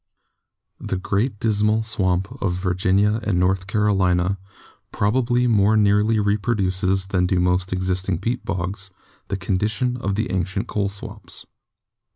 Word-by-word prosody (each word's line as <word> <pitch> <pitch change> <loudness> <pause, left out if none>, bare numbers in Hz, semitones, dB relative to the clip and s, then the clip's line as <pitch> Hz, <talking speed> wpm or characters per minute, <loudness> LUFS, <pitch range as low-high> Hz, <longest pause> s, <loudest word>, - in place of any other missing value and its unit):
The 95 - -3
Great 100 +4 -1
Dismal 110 0 +2
Swamp 95 -4 0
of 90 -2 0
Virginia 95 +3 +1
and 100 -5 0
North 95 +1 +1
Caro 105 +1 +1
lina 90 0 +1 0.5
probably 120 +3 +1
more 110 -2 +3
nearly 105 +1 +3
reproduces 100 -3 0
than 90 -2 0
do 90 0 +1
most 90 +1 +1
exist 95 0 -1
ing 90 - +1
peat 120 +7 -3
bogs 95 +1 -4 0.4
the 100 - -2
conditions 105 +7 -1
of 100 -3 -2
the 110 +3 -2
ancient 95 +2 -1
coal 100 -2 -1
swamps. 100 0 -7
100 Hz, 140 wpm, -22 LUFS, 95-105 Hz, 0.5 s, more